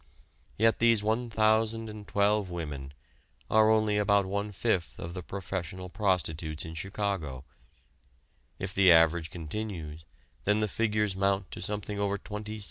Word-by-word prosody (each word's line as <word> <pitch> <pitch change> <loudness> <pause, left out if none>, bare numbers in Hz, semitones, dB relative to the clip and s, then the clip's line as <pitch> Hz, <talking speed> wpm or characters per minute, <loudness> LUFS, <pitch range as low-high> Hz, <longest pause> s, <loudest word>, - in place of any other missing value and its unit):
Yet 115 +1 +3
these 115 -2 +4
1012 110 -2 +1
women 75 -6 -5 0.6
are 110 0 +6
only 110 -1 +3
about 100 -1 +3
one 100 +2 -2
fifth 100 -3 -1
of 85 +1 -6
the 90 - -5
professional 90 -1 -5
prostitutes 85 -6 -1
in 80 - -7
Chicago. 85 -6 -3 1.1
If 95 0 -4
the 95 -2 +6
average 80 0 +5
continues, 80 -2 -6 0.4
then 105 +1 +2
the 105 - +1
figures 105 -2 0
mount 95 0 0
to - - -7
something 105 +1 -3
over 100 0 0
27,000,000. 105 +1 -6
100 Hz, 130 wpm, -29 LUFS, 85-105 Hz, 1.1 s, are